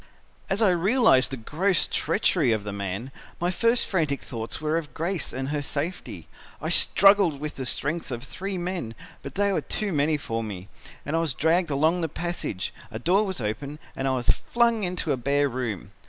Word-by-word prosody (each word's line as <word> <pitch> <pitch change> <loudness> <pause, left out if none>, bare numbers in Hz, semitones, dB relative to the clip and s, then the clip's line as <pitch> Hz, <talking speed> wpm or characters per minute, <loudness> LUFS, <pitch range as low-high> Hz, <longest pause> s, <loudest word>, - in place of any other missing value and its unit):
"As 200 +4 +1
I 200 - +5
realised 190 - +4
the 135 - -4
gross 170 - +1
treachery 170 - +2
of 110 -2 0
the 105 -1 -5
man, 100 +6 -4 0.3
my 175 +1 +1
first 230 +5 +2
frantic 155 -7 0
thoughts 115 -2 -4
were 155 +1 0
of 150 -6 -3
Grace 170 0 -2
and 130 +1 -4
her 145 0 -1
safety. 150 +5 -4 0.3
I - - -3
struggled 195 -7 +5
with 150 +1 -4
the 130 -2 -3
strength 155 +7 -1
of 120 -2 -5
three 190 +6 -5
men, 175 -10 -4 0.3
but 140 - -8
they 200 0 +2
were - - +1
too 210 -2 -1
many 150 0 +2
for 115 -5 -3
me 100 -2 -7 0.4
and 150 - -2
I - - +3
was 160 -6 -1
dragged 165 +4 +2
along 160 +5 +2
the 165 - -1
passage, 170 - -3 0.2
a 115 - -6
door 180 - +3
was 190 -5 -1
opened 125 +7 -4 0.2
and 135 - -2
I - - +2
was 125 -1 -2
flung 235 -2 +2
into 180 -4 -1
a 135 - +1
bare 140 +3 +2
room. 120 -7 -4
150 Hz, 200 wpm, -26 LUFS, 130-180 Hz, 0.4 s, I